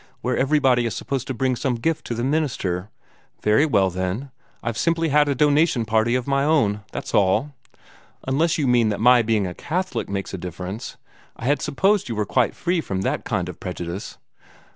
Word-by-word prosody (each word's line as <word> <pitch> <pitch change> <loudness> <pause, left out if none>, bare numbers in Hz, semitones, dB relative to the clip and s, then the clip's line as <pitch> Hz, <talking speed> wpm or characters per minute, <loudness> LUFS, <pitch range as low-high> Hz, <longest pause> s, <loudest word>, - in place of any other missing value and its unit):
where 125 0 0
everybody 130 -4 +3
is 105 - -4
supposed 135 -3 -3
to - - -2
bring 130 +1 +1
some 125 0 -1
gift 155 +7 -1
to 120 - -3
the 120 - -2
minister. 120 - -1 0.5
Very 110 +9 +4
well, 95 -9 +2
then, 95 +9 -3 0.3
I've 115 -1 -2
simply 165 +5 +1
had 145 0 +4
a 140 - +1
donation 145 -3 +3
party 110 +2 +2
of 125 -1 -1
my 140 0 +1
own, 135 -10 +2
that's - - -6
all. 105 +9 +2 0.8
Unless 155 +5 +2
you 150 - 0
mean 120 -3 +3
that 105 - -2
my 125 +1 +6
being 110 -3 +1
a 90 - -4
Catholic 185 - -3
makes 100 0 -4
a 95 - -4
difference. 90 +4 -6 0.4
I - - -8
had 145 +3 +2
supposed 190 +3 +1
you 115 - -2
were 105 0 0
quite 125 +1 +1
free 175 -1 0
from 95 -9 -3
that - - -2
kind 90 -5 -1
of 90 - -8
prejudice." 90 +1 -6
120 Hz, 195 wpm, -23 LUFS, 100-145 Hz, 0.8 s, my